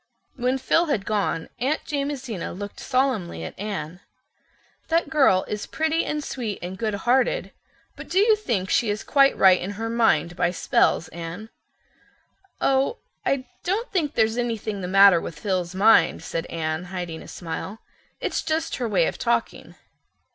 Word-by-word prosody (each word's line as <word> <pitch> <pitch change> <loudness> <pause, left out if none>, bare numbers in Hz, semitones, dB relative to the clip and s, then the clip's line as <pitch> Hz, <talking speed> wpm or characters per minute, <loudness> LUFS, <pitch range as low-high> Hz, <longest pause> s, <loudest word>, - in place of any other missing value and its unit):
When 255 +1 0
Phil 330 +6 +2
had 225 -10 -1
gone 200 -6 -1
Aunt 275 +6 0
Jamesina 275 - -3
looked 205 +3 -7
solemnly 255 - -1
at 80 - -6
Anne. 180 -5 -5 0.9
"That 330 -2 +1
girl 265 -12 +4
is 210 -1 -4
pretty 320 +1 0
and 300 0 -2
sweet 230 -8 -4
and 180 +2 -5
goodhearted, 230 +5 0 0.4
but - - -10
do 370 - -1
you 430 +2 +6
think 230 - -2
she 230 - +2
is 205 +1 -2
quite 275 -1 +4
right 185 -1 +6
in 195 +3 -4
her 225 +1 -3
mind, 225 -7 +2
by 175 - +1
spells, 165 -2 +1
Anne?" 170 +6 -7 1.1
"Oh, 270 - +2 0.3
I 265 -2 +1 0.2
don't 410 +7 -1
think 315 -7 -1
there's 220 +1 +2
anything 220 -4 -2
the 180 - -3
matter 195 -2 +6
with 150 - -7
Phil's 185 0 -2
mind," 220 +4 +4
said 165 - -4
Anne, 155 +1 -3
hiding 175 -3 -5
a - - -12
smile. 180 +4 -6 0.4
"It's - - -1
just 320 +1 -2
her 240 -3 -2
way - - +3
of - - -3
talking." - - -1
220 Hz, 160 wpm, -24 LUFS, 185-275 Hz, 1.1 s, you